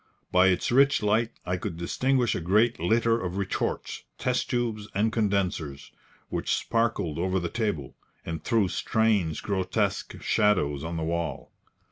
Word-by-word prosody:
By 90 +1 +5
its 90 +3 +1
rich 135 -1 +4
light 110 +2 +2 0.2
I 90 +1 -1
could 90 -2 -5
distinguish 125 +8 +1
a - - -3
great 105 +8 +2
litter 115 +6 +2
of 90 0 -3
retorts, 100 -1 -2 0.2
test - - -1
tubes 115 -4 -1
and 110 +3 +2
condensers, 95 -10 -1 0.4
which - - 0
sparkled 105 -9 -1
over 95 +2 +1
the 85 -1 -3
table, 105 - -2 0.3
and 80 -1 -5
threw 110 -4 +2
strange, 100 -4 +1
grotesque 95 -2 -1
shadows 75 -10 +1
on 85 +1 -4
the 80 - -2
wall. 85 0 -3
100 Hz, 145 wpm, -27 LUFS, 85-115 Hz, 0.4 s, By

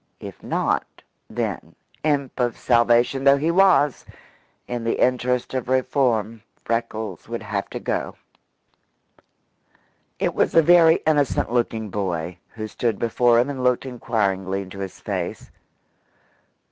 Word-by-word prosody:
If - - -10
not, - - -2 0.3
then - - -4 0.3
imp 140 -4 -1
of 120 -1 0
salvation 120 +2 +3
though 140 0 +6
he 155 +4 0
was 180 -6 +4 0.6
in 120 -1 -4
the 115 - -1
interest 125 0 +1
of 130 -2 -3
reform, 125 -4 +1 0.2
Freckles 110 -4 -3
would 115 -1 -4
have 100 -1 -3
to - - -5
go. - - -3 2.0
It - - -1
was - - +1
a 165 - +7
very 165 0 +5
innocent 145 -6 +1
looking 115 -3 -1
boy 90 -3 -3 0.2
who 110 -1 -5
stood 110 0 -2
before 120 +1 +2
him 120 - +2
and 135 -3 -4
looked 125 +1 +2
inquiringly 100 -6 -1
into 95 +1 -11
his 95 -1 -6
face. - - -5
120 Hz, 130 wpm, -23 LUFS, 110-135 Hz, 2.0 s, a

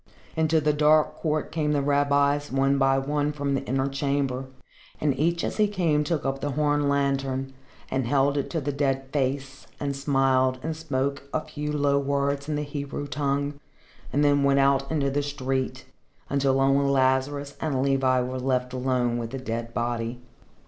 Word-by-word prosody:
Into 160 0 +2
the 150 0 +2
dark 150 +1 +3
court 155 -2 -1
came 150 -2 0
the 145 - +1
rabbis 145 0 +2
one 135 +1 +2
by 135 0 +3
one 145 +2 0
from 145 -1 -2
the 135 - -1
inner 135 +1 0
chamber, 140 -1 -1 0.5
and 145 -3 +1
each 170 +4 0
as - - -3
he 215 -1 +4
came 170 -7 +1
took 150 -1 -2
up 135 0 -2
the 145 -1 -2
horn 145 0 +1
lantern 135 -1 0 0.4
and 130 -3 0
held 140 +2 +2
it 140 - -1
to 165 - -1
the 145 0 -2
dead 135 -1 0
face 135 -1 -2
and 140 -1 -2
smiled 135 -2 +2
and 160 0 -2
spoke 140 -2 -3
a 155 - 0
few 150 -1 -5
low 140 -1 +2
words 140 +1 -1
in 150 - 0
the 150 - -1
Hebrew 145 0 -5
tongue 140 +1 -2 0.5
and 145 +3 +2
then 145 0 +4
went 140 0 +3
out 135 0 +3
into 140 -3 +1
the 145 +1 0
street, 135 -2 -3 0.5
until 135 -1 +2
only 135 +1 +3
Lazarus 140 +1 +1
and 135 -4 0
Levi 135 -2 +2
were 130 +1 -3
left 125 -1 -1
alone 125 -2 0
with 115 -1 -4
the 135 - -5
dead 115 -2 -4
body. 120 0 -2
140 Hz, 180 wpm, -26 LUFS, 135-145 Hz, 0.5 s, he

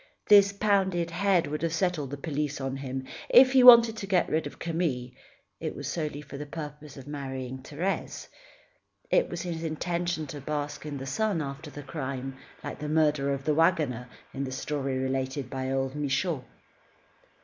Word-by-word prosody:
This 200 -1 +7
pounded 190 -4 +1
head 180 -1 +2
would 150 +1 -4
have 165 0 0
set 180 -2 +1
all 145 - -3
the 145 +2 -6
police 145 -1 -3
on 135 0 -3
him. 135 -1 -4 0.3
If 260 +1 +8
he 265 -1 +6
wanted 235 -2 +9
to 200 - -5
get 185 -3 +2
rid 160 +1 +1
of - - -11
Camille, 160 -8 -2 0.5
it - - -4
was - - -5
solely 150 -3 -3
for 140 -1 -9
the 150 - -6
purpose 150 -1 -8
of 135 - -10
marrying 130 -3 -5
Thérèse. 165 +8 -3 0.8
It - - +3
was - - -4
his 165 -2 -4
intention 170 +1 -2
to 145 - -7
bask 150 +1 -4
in 145 -1 -4
the 135 - -6
sun, 200 +7 0
after 145 +1 -5
the 145 0 -9
crime, 135 0 -5 0.3
like - - -6
the 150 - -4
murderer 150 -3 +2
of 135 - -8
the 155 - +2
wagoner, 150 -7 +2 0.2
in 135 - -3
the 130 - -4
story 135 0 -2
related 130 0 -2
by 130 0 -3
old 135 0 -1
Michaud. 145 +1 -1
150 Hz, 180 wpm, -28 LUFS, 135-170 Hz, 0.8 s, wanted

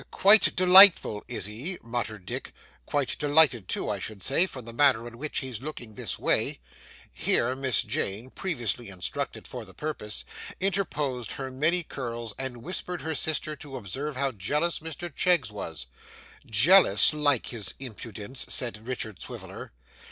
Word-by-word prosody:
'Quite 205 +2 +5
delightful, 185 - +7
is 110 -6 -3
he?' 125 - -4
muttered 115 -4 -4
Dick. - - -6 0.3
'Quite 145 -3 -2
delighted 145 -8 +3
too, - - -2
I 100 - -2
should 100 0 -7
say, 155 - +2
from 130 -9 -9
the 115 - -8
manner 125 -3 +3
in 120 0 -12
which 150 +1 -2
he's 130 -4 -5
looking 130 -6 -7
this - - -2
way.' - - 0 0.5
Here 125 +2 +1
Miss 130 -3 +1
Jane 115 -1 -3
(previously 120 - -2
instructed 90 -2 -4
for - - -7
the - - -14
purpose) 105 -9 -4 0.3
interposed 150 - -1
her 135 -1 -6
many 160 +7 +1
curls 120 -6 -6
and 125 -3 -5
whispered 180 +1 -4
her 160 - -3
sister 155 +1 -1
to 140 -3 -8
observe 135 +7 -5
how 135 +1 0
jealous 150 - 0
Mr 160 0 -7
Cheggs 170 - +2
was. 80 -10 -6 0.6
'Jealous! 115 - +7
Like 145 -5 +1
his 110 -6 -2
impudence!' 115 -1 -4
said 115 -3 -1
Richard 110 -6 -2
Swiviller. - - -8
130 Hz, 150 wpm, -27 LUFS, 110-155 Hz, 0.6 s, delightful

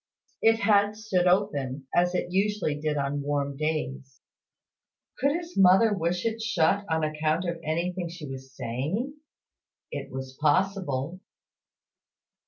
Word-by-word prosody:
It 225 0 +4
had 205 -1 +4
stood 190 -5 +1
open, 145 -8 +1
as 175 +1 +3
it 180 - -1
usually 195 -3 +1
did 150 0 -2
on 140 +1 -1
warm 140 -1 -1
days. 145 -3 -3 1.0
Could 280 +2 +3
his 340 +1 -5
mother 195 +4 +6
wish 175 0 -1
it 225 0 -1
shut 200 -1 +2
on 160 -1 +1
account 155 +3 0
of 170 -1 -2
anything 170 +3 -2
she 165 -3 -8
was 135 0 -8
saying? 145 - -2 0.8
It - - -5
was 130 0 -6
possible. 175 -2 +1
170 Hz, 130 wpm, -27 LUFS, 145-195 Hz, 1.0 s, mother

